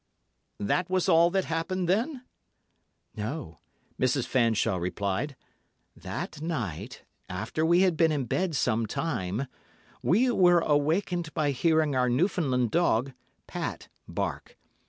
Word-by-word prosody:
"That 170 - 0
was 185 0 +1
all 170 -1 +5
that 190 +1 0
happened, 170 +3 -2
then?" 245 - 0 0.9
"No," 110 - -5 0.4
Mrs. 130 0 +2
Fanshawe 115 -6 +2
replied. 100 - -2 0.6
"That - - -6
night, 120 - -4 0.3
after 110 +12 -3
we 170 +2 +4
had 185 -4 +3
been 165 -1 +4
in 145 -4 -1
bed 180 +6 -1
some 115 -4 +1
time, 110 - -2 0.6
we 245 +8 +3
were 175 -5 +5
awakened 165 +3 +1
by 150 -2 +1
hearing 155 +1 +2
our 125 -1 +2
Newfoundland 130 - +1
dog, 135 -6 +2 0.3
Pat, - - -5 0.2
bark. - - -4
150 Hz, 120 wpm, -28 LUFS, 120-175 Hz, 0.9 s, all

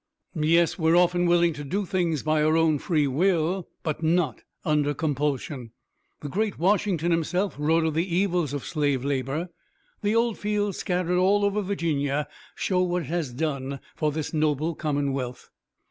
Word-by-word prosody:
"Yes, 165 +2 +2
we're 165 +1 +4
often 175 0 +3
willing 170 -1 +4
to 145 - -7
do 195 +8 -2
things 175 -6 0
by 155 0 +2
our 155 +1 +3
own 160 -3 +3
free 155 -3 +1
will, 170 +4 +1 0.2
but 155 -1 -2
not 160 -6 +1 0.2
under 145 -1 +1
compulsion. 140 -4 -2 0.5
The 145 - -5
great 205 +7 -1
Washington 180 -2 +1
himself 180 +4 0
wrote 160 +2 +2
of 160 - 0
the 170 +2 -1
evils 180 -6 +1
of 145 -2 -4
slave 145 -4 0
labor. 140 +5 -2 0.5
The 210 +1 +1
'old 230 -1 +1
fields' 205 -2 -1
scattered 180 -1 0
all 200 +2 +3
over 200 +1 +1
Virginia 150 -7 -1 0.3
show 185 -2 0
what 180 -1 0
it 145 - -9
has 165 -6 -2
done 140 -1 -3 0.2
for 155 -1 0
this 155 +2 -4
noble 155 +1 +1
commonwealth." 140 -5 -3
160 Hz, 160 wpm, -26 LUFS, 145-180 Hz, 0.5 s, we're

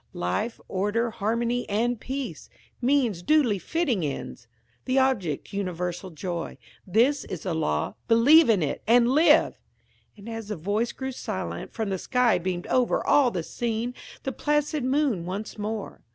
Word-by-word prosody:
Life, 90 - -2
order, 210 +5 0
harmony, 230 +3 -1
and 230 +3 0
peace; 265 +2 -5 0.3
means 245 -8 +2
duly 245 -3 +3
fitting 275 - -1
ends; 135 -4 -5 0.4
the 255 - 0
object, 210 - 0
universal 180 -1 -3
joy. 170 0 -5 0.3
This 245 +9 +3
is 180 - -6
the 185 - -2
law. 75 - -1
Believe 265 +7 +6
in 200 -7 +4
it, 145 - -2
and 235 +1 +5
live!" 305 +2 +4 0.6
And 205 +1 -12
as 225 -2 -6
the 210 - -3
voice 205 +8 -1
grew 265 0 -5
silent, 215 -7 -5
from 220 -3 -3
the 190 - -1
sky 250 -4 +2
beamed 175 0 -3
over 250 -2 +1
all 280 -4 +5
the 180 -7 -3
scene 235 +4 -3 0.3
the 270 - -2
placid 295 0 0
moon 260 - +1
once 205 +4 -5
more. 210 0 -4
225 Hz, 150 wpm, -26 LUFS, 185-255 Hz, 0.6 s, Believe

